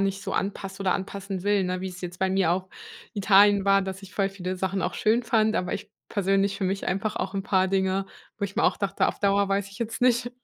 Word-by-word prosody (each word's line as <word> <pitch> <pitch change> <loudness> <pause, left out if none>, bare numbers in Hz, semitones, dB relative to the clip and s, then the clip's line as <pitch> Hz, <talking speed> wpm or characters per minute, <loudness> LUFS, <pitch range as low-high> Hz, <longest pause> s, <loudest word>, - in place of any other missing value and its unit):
nicht 195 0 -1
so - - -4
anpasst 195 0 -3
oder 190 -2 +2
anpassen 195 -1 -4
will, 205 -1 +2
ne, 180 0 -2
wie's 185 -1 -6
jetzt 180 0 -7
bei 190 -1 +1
mir 190 -3 +2
auch 185 +2 -1 0.4
in 210 - -6
Italien 200 0 +6
war, 195 0 +4
dass 190 +1 -6
ich 195 - -12
voll 195 -1 +1
viele 185 -1 -4
Sachen 190 +1 -1
auch 180 - -2
schön 225 +3 +2
fand, 220 -2 +2
aber 180 -1 -1
ich 200 - -7 0.2
persönlich 195 0 +1
für 195 - -2
mich 195 +1 -1
einfach 195 +3 -1
auch 195 +1 -3
'n 195 - -1
paar 190 -1 +2
Dinge, 190 0 0 0.3
wo 200 - -1
ich 200 0 -6
mir - - +2
auch - - +3
dachte, 200 -2 +1
auf - - -4
Dauer 200 0 +2
weiß 195 0 0
ich 200 - -12
jetzt 225 -1 -4
nicht, 245 0 +2
195 Hz, 255 wpm, -26 LUFS, 190-200 Hz, 0.4 s, Italien